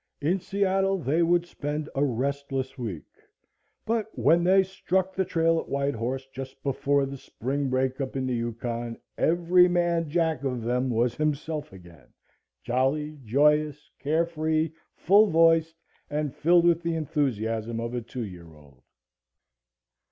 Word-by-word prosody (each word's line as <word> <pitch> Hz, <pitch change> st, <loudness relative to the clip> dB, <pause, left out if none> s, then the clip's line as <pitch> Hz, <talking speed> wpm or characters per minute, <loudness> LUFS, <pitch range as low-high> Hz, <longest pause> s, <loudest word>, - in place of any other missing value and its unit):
In 170 Hz, +7 st, +1 dB
Seattle 195 Hz, 0 st, +1 dB
they 160 Hz, 0 st, 0 dB
would 170 Hz, +1 st, +3 dB
spend 150 Hz, -2 st, -4 dB
a 135 Hz, -, +1 dB
restless 135 Hz, +1 st, -2 dB
week, 110 Hz, -, -5 dB, 0.8 s
but 225 Hz, -1 st, 0 dB
when 170 Hz, +3 st, +4 dB
they 190 Hz, +2 st, +5 dB
struck 190 Hz, 0 st, -1 dB
the 190 Hz, -, 0 dB
trail 165 Hz, -2 st, +1 dB
at -, -, -7 dB
White 140 Hz, 0 st, 0 dB
Horse 125 Hz, +4 st, -3 dB
just 130 Hz, 0 st, -8 dB
before 140 Hz, 0 st, +1 dB
the 135 Hz, 0 st, -6 dB
spring 135 Hz, +4 st, -3 dB
breakup 130 Hz, +1 st, -1 dB
in 130 Hz, -1 st, -1 dB
the 130 Hz, -, -1 dB
Yukon 115 Hz, 0 st, -3 dB, 0.2 s
every 175 Hz, +2 st, +4 dB
man 175 Hz, -2 st, +1 dB
jack 160 Hz, -3 st, 0 dB
of 125 Hz, -4 st, -2 dB
them 125 Hz, +2 st, 0 dB
was 120 Hz, 0 st, +1 dB
himself 155 Hz, +1 st, -2 dB
again 85 Hz, -5 st, -15 dB, 0.6 s
jolly, 145 Hz, +4 st, -1 dB
joyous, 150 Hz, +4 st, +2 dB
carefree, 160 Hz, +1 st, 0 dB, 0.2 s
full 205 Hz, +4 st, +5 dB
voiced 165 Hz, -2 st, +4 dB, 0.3 s
and 150 Hz, -2 st, -2 dB
filled 170 Hz, +2 st, +4 dB
with 170 Hz, -1 st, +4 dB
the 170 Hz, -1 st, -1 dB
enthusiasm 115 Hz, -8 st, -1 dB
of 115 Hz, +1 st, -4 dB
a 120 Hz, -, -2 dB
two 120 Hz, +1 st, -6 dB
year 85 Hz, -4 st, -11 dB
old. 70 Hz, -4 st, -20 dB
145 Hz, 145 wpm, -26 LUFS, 125-165 Hz, 0.8 s, they